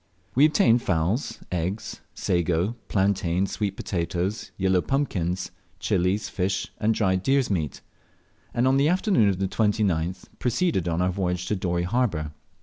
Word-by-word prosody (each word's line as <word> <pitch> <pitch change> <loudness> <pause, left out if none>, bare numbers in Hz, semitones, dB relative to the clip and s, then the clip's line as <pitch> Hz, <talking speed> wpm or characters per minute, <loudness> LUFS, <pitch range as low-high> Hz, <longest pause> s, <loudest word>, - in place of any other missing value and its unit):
We 140 +4 +6
obtained 120 -6 +4
fowls, 90 - -1
eggs, 90 +4 -3
sago, 90 +5 0
plantains, 95 -2 +1
sweet 100 -2 -2
potatoes, 90 +3 -2
yellow 95 -1 +2
pumpkins, 95 - -1 0.3
chilies, 95 +1 +1
fish, 95 0 -2
and 110 +1 +2
dried 95 -3 +1
deer's 135 +2 +2
meat; 80 -7 -2 0.7
and 120 +2 +1
on 135 +1 +4
the 140 +2 +4
afternoon 180 - +3
of 95 - 0
the 95 0 0
29th 95 -5 0 0.2
proceeded 125 - 0
on 85 +1 +1
our 90 - +1
voyage 90 -1 -1
to 105 - +1
Dorey 90 -2 -1
harbour. 90 -7 0
95 Hz, 145 wpm, -25 LUFS, 90-115 Hz, 0.7 s, We